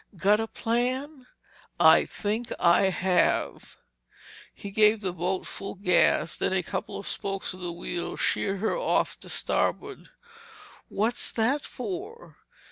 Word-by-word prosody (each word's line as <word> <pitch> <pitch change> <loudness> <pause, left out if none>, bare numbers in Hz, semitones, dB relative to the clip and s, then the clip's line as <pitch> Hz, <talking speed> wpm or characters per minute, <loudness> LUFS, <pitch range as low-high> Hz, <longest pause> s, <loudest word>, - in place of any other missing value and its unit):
"Got 205 +4 +3
a 225 - -2
plan?" 255 +5 -2 0.5
"I - - +7
think 220 +3 -3
I 175 +2 +5
have." 185 -1 0 0.7
He 200 - -9
gave 215 +1 +4
the 185 -3 -2
boat 180 +2 -2
full 195 - -7
gas, 170 -4 +2
then - - -1
a 190 -1 +1
couple - - -5
of - - -7
spokes 195 -1 -3
of 185 - -11
the 175 -1 -4
wheel 175 0 -4
sheered 195 -1 0
her 220 - 0
off - - 0
to - - -12
starboard. - - -2 0.8
"What's 225 +4 -1
that 250 +6 +1
for?" 390 - -7
205 Hz, 135 wpm, -27 LUFS, 185-240 Hz, 0.8 s, I